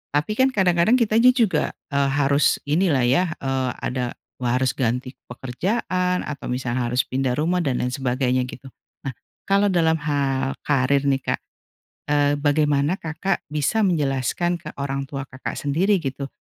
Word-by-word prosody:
tapi 180 Hz, -, 0 dB
kan 260 Hz, -, +6 dB
kadang-kadang 180 Hz, +3 st, +4 dB
kitanya 235 Hz, +1 st, +4 dB
juga, 210 Hz, -, +1 dB, 0.2 s
eee, 140 Hz, 0 st, +2 dB
harus 140 Hz, 0 st, +2 dB
ini 155 Hz, +7 st, +1 dB
lah 140 Hz, -7 st, +2 dB
ya, 155 Hz, +7 st, +2 dB
eee, 130 Hz, -1 st, -1 dB
ada, 125 Hz, -1 st, -2 dB, 0.2 s
wah 120 Hz, -1 st, -1 dB
harus 130 Hz, -, +3 dB
ganti 125 Hz, +1 st, -1 dB
pekerjaan, 180 Hz, -, -1 dB
atau 145 Hz, -2 st, -6 dB
misalnya 125 Hz, -1 st, -1 dB
harus 125 Hz, +1 st, +2 dB
pindah 130 Hz, -1 st, -1 dB
rumah, 165 Hz, +5 st, +1 dB
dan 140 Hz, -7 st, 0 dB
lain 125 Hz, -, 0 dB
sebagainya 130 Hz, -1 st, 0 dB
gitu. 130 Hz, +1 st, -10 dB, 0.3 s
Nah, 135 Hz, -, -3 dB, 0.4 s
kalau 200 Hz, +1 st, +4 dB
dalam 160 Hz, -2 st, +3 dB
hal 135 Hz, -3 st, 0 dB
karir 140 Hz, 0 st, +2 dB
nih, 135 Hz, -1 st, +1 dB
Kak, -, -, -3 dB, 0.7 s
eee, 145 Hz, -1 st, +3 dB
bagaimana 145 Hz, +3 st, +1 dB
Kakak 165 Hz, +4 st, -3 dB
bisa 150 Hz, +8 st, 0 dB
menjelaskan 155 Hz, +1 st, 0 dB
ke -, -, -9 dB
orang 140 Hz, 0 st, -3 dB
tua 135 Hz, 0 st, -5 dB
Kakak 130 Hz, -1 st, -6 dB
sendiri 175 Hz, +7 st, +1 dB
gitu, 135 Hz, -1 st, -4 dB
145 Hz, 155 wpm, -23 LUFS, 130-175 Hz, 0.7 s, kan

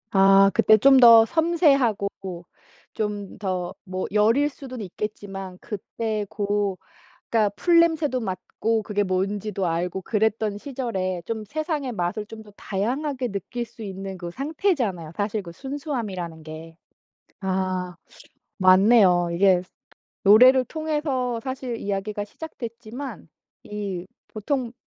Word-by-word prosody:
아 195 Hz, 0 st, +6 dB
그때 215 Hz, -1 st, +5 dB
좀 270 Hz, +5 st, +6 dB
더 230 Hz, -2 st, +9 dB
섬세하고 280 Hz, -, +2 dB, 0.8 s
좀 205 Hz, -2 st, -4 dB
더 185 Hz, -3 st, -3 dB
뭐 185 Hz, -1 st, -3 dB
여릴 225 Hz, +8 st, +3 dB
수는 260 Hz, -4 st, -9 dB
있겠지만 195 Hz, -1 st, -6 dB
그때 215 Hz, 0 st, -4 dB
고 205 Hz, -2 st, -1 dB, 0.5 s
그러니까 220 Hz, -3 st, +3 dB
풀 340 Hz, -, +4 dB
냄새도 315 Hz, -6 st, +2 dB
맡고 220 Hz, +2 st, -2 dB
그게 205 Hz, -1 st, 0 dB
뭔지도 195 Hz, +1 st, -1 dB
알고 175 Hz, +3 st, -2 dB
그랬던 215 Hz, 0 st, 0 dB
시절에 210 Hz, -9 st, -3 dB
좀 220 Hz, -2 st, -4 dB
세상의 305 Hz, -, -3 dB
맛을 180 Hz, +2 st, -2 dB
좀 220 Hz, +1 st, -10 dB
더 210 Hz, -, -16 dB
다양하게 250 Hz, +6 st, -2 dB
느낄 220 Hz, +5 st, -4 dB
수 230 Hz, -1 st, -12 dB
있는 195 Hz, -1 st, -6 dB
그 175 Hz, -1 st, -6 dB
상태잖아요 265 Hz, -, -1 dB
사실 205 Hz, +1 st, -1 dB
그 170 Hz, -, -9 dB
순수함이라는 215 Hz, -, -5 dB
게. 160 Hz, +1 st, -10 dB, 0.7 s
아 185 Hz, -1 st, -2 dB, 0.6 s
맞네요. 185 Hz, -2 st, +5 dB
이게 185 Hz, 0 st, +4 dB, 0.6 s
노래를 255 Hz, +6 st, +7 dB
통해서 295 Hz, -6 st, -2 dB
사실 260 Hz, -2 st, -4 dB
이야기가 205 Hz, +1 st, -3 dB
시작됐지만 235 Hz, -, -8 dB, 0.4 s
이 200 Hz, -4 st, -5 dB, 0.2 s
보통 235 Hz, +2 st, -3 dB
210 Hz, 255 characters per minute, -24 LUFS, 190-255 Hz, 0.8 s, 더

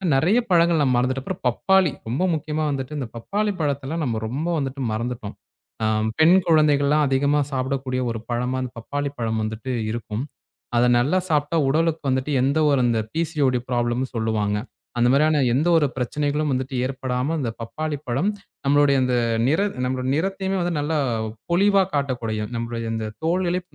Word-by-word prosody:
நிறைய 180 Hz, -, +3 dB
பழங்கள் 170 Hz, -1 st, +4 dB
நம்ம 130 Hz, -3 st, +2 dB
மறந்துட்டோம். 130 Hz, +2 st, 0 dB
அப்புறம் -, -, -5 dB
பப்பாளி. 190 Hz, +7 st, +3 dB, 0.2 s
ரொம்ப 135 Hz, +10 st, 0 dB
முக்கியமா 155 Hz, 0 st, -2 dB
வந்துட்டு 135 Hz, +2 st, -4 dB
இந்தப் 125 Hz, -5 st, -5 dB
பப்பாளிப் 205 Hz, -, -2 dB
பழத்தை 140 Hz, -3 st, -1 dB
எல்லாம் 160 Hz, +2 st, -2 dB
நம்ம 115 Hz, -3 st, -1 dB
ரொம்ப 140 Hz, +9 st, -3 dB
வந்துட்டு 135 Hz, -1 st, -3 dB
மறந்துட்டோம். 115 Hz, -1 st, -4 dB, 0.5 s
அ -, -, +2 dB, 0.3 s
பெண் 165 Hz, +4 st, +7 dB
குழந்தைகள் 150 Hz, -3 st, +4 dB
எல்லாம் 150 Hz, 0 st, +3 dB
அதிகமா 140 Hz, +2 st, +2 dB
சாப்பிடக்கூடிய 130 Hz, -1 st, -2 dB
ஒரு 115 Hz, -, -4 dB
பழமா 125 Hz, +2 st, -1 dB
இந்தப் 125 Hz, -2 st, -8 dB
பப்பாளிப்பழம் 120 Hz, -3 st, -3 dB
வந்துட்டு 110 Hz, +4 st, -4 dB, 0.2 s
இருக்கும். 115 Hz, +1 st, -4 dB, 0.5 s
அதை 120 Hz, +1 st, +4 dB
நல்லா 150 Hz, +10 st, +2 dB
சாப்பிட்டா 150 Hz, +1 st, +1 dB
உடலுக்கு 160 Hz, +2 st, +1 dB
வந்துட்டு 130 Hz, +3 st, 0 dB
எந்த 140 Hz, +4 st, +2 dB
ஒரு 140 Hz, -3 st, +3 dB
இந்த 115 Hz, -2 st, +1 dB
பிசிஓடி 145 Hz, -6 st, +1 dB
ப்ராப்ளம்ன்னு 120 Hz, +1 st, 0 dB
சொல்லுவாங்க. 110 Hz, -2 st, 0 dB, 0.4 s
அந்த 120 Hz, 0 st, +4 dB
மாதிரியான 150 Hz, +1 st, +3 dB
எந்த 145 Hz, +7 st, +1 dB
ஒரு 150 Hz, -3 st, +3 dB
பிரச்சனைகளும் 145 Hz, +4 st, -1 dB
வந்துட்டு 130 Hz, +1 st, -3 dB
ஏற்படாமல் 130 Hz, +3 st, -2 dB
அந்தப் 115 Hz, -5 st, -3 dB
பப்பாளிப்பழம் 145 Hz, -, -2 dB, 0.4 s
நம்மளுடைய 140 Hz, 0 st, +4 dB
அந்த 125 Hz, -1 st, +1 dB, 0.3 s
நிற 160 Hz, +7 st, +2 dB, 0.2 s
நம்முடைய 130 Hz, 0 st, -2 dB
நிறத்தையுமே 190 Hz, +3 st, -1 dB
வந்து 175 Hz, 0 st, -1 dB
நல்லா 150 Hz, +2 st, 0 dB, 0.5 s
பொலிவா 195 Hz, +2 st, +4 dB
காட்டக்கூடிய 120 Hz, -6 st, -1 dB
நம்மளுடைய 115 Hz, -1 st, -3 dB
இந்தத் 110 Hz, -1 st, -4 dB
தோலிலே 180 Hz, +1 st, +1 dB
140 Hz, 155 wpm, -23 LUFS, 125-155 Hz, 0.5 s, பெண்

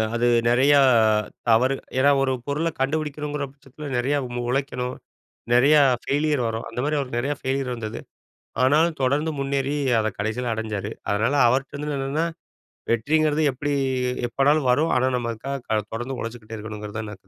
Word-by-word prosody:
அது 120 Hz, +1 st, +2 dB, 0.2 s
நெறையா 135 Hz, +4 st, +5 dB, 0.7 s
தவறு 125 Hz, +4 st, +4 dB, 0.2 s
ஏன்னா, 140 Hz, +2 st, +5 dB
ஒரு 130 Hz, -, +1 dB
பொருளை 150 Hz, +4 st, 0 dB
கண்டுபிடிக்கணங்கிற 150 Hz, 0 st, -2 dB
பட்சத்தில 145 Hz, +1 st, -10 dB
நெறையா 140 Hz, +4 st, +1 dB, 0.3 s
உழைக்கணும். 130 Hz, -1 st, -2 dB, 0.6 s
நெறையா 145 Hz, +5 st, +6 dB, 0.2 s
ஃபெயிலியர் 145 Hz, -3 st, 0 dB
வரும் 115 Hz, 0 st, -4 dB
அந்தமாரி 135 Hz, +6 st, -2 dB
அவருக்கு 125 Hz, -3 st, -3 dB
நெறையா 145 Hz, +4 st, -1 dB
ஃபெயிலியர் 130 Hz, -1 st, -1 dB
வந்தது. 110 Hz, -2 st, -6 dB, 0.6 s
ஆனாலும் 155 Hz, +5 st, +3 dB
தொடர்ந்து 145 Hz, +5 st, +1 dB
முன்னேறி 140 Hz, +1 st, -1 dB, 0.2 s
அத 110 Hz, -, 0 dB
கடைசியில 115 Hz, +4 st, -2 dB
அடைஞ்சாரு. 110 Hz, -1 st, -4 dB, 0.2 s
அதனால 110 Hz, +6 st, +1 dB
அவர்ட்டருந்து 140 Hz, +4 st, -1 dB
என்னன்னா, 140 Hz, +5 st, -1 dB, 0.7 s
வெற்றிங்கிறது 150 Hz, +6 st, +2 dB
எப்டி 145 Hz, +3 st, -3 dB, 0.6 s
எப்போனாலும் 140 Hz, +2 st, +2 dB
வரும். 155 Hz, +6 st, +2 dB
ஆனா, 130 Hz, +1 st, +2 dB
நமக்காக 120 Hz, +3 st, -4 dB
க 110 Hz, -1 st, +2 dB
தொடர்ந்து 120 Hz, +3 st, -4 dB
உழைச்சுட்டே 115 Hz, -1 st, -7 dB
இருக்கணுங்கிறதுதான் 105 Hz, 0 st, -6 dB
நான் 95 Hz, 0 st, -17 dB
135 Hz, 130 wpm, -23 LUFS, 115-145 Hz, 0.7 s, நெறையா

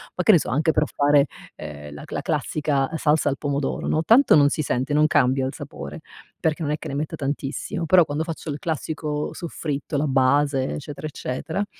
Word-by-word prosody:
Ma 180 Hz, -, -1 dB
che 215 Hz, -, +7 dB
ne 170 Hz, -, +6 dB
so, -, -, -4 dB
anche 155 Hz, +5 st, +2 dB
per 150 Hz, -, +2 dB
fare 145 Hz, 0 st, +4 dB, 0.3 s
ehm, 75 Hz, -1 st, -8 dB
la 75 Hz, -, -9 dB
la -, -, -4 dB
classica 140 Hz, -3 st, 0 dB
salsa 155 Hz, -1 st, +2 dB
al 135 Hz, -, -2 dB
pomodoro, 140 Hz, -1 st, -2 dB
no, 155 Hz, -, +1 dB
tanto 230 Hz, -, +6 dB
non 145 Hz, -1 st, +6 dB
si 155 Hz, -, -1 dB
sente, 135 Hz, +1 st, -1 dB
non 150 Hz, +1 st, +4 dB
cambia 130 Hz, -2 st, +2 dB
il -, -, -5 dB
sapore, 145 Hz, +3 st, -8 dB, 0.4 s
perché 160 Hz, +1 st, 0 dB
non 150 Hz, -1 st, -1 dB
è 150 Hz, -, 0 dB
che -, -, -8 dB
ne -, -, -5 dB
metta 150 Hz, +2 st, -3 dB
tantissimo, 145 Hz, +6 st, -3 dB
però 180 Hz, -1 st, +6 dB
quando 150 Hz, +1 st, -2 dB
faccio 165 Hz, -1 st, -5 dB
il 145 Hz, -, -5 dB
classico 155 Hz, -1 st, -3 dB
soffritto, 150 Hz, -3 st, -4 dB
la 145 Hz, -, +1 dB
base, 135 Hz, 0 st, +2 dB
eccetera, 150 Hz, +1 st, -6 dB
eccetera, 155 Hz, +7 st, -3 dB
145 Hz, 205 wpm, -23 LUFS, 140-155 Hz, 0.4 s, che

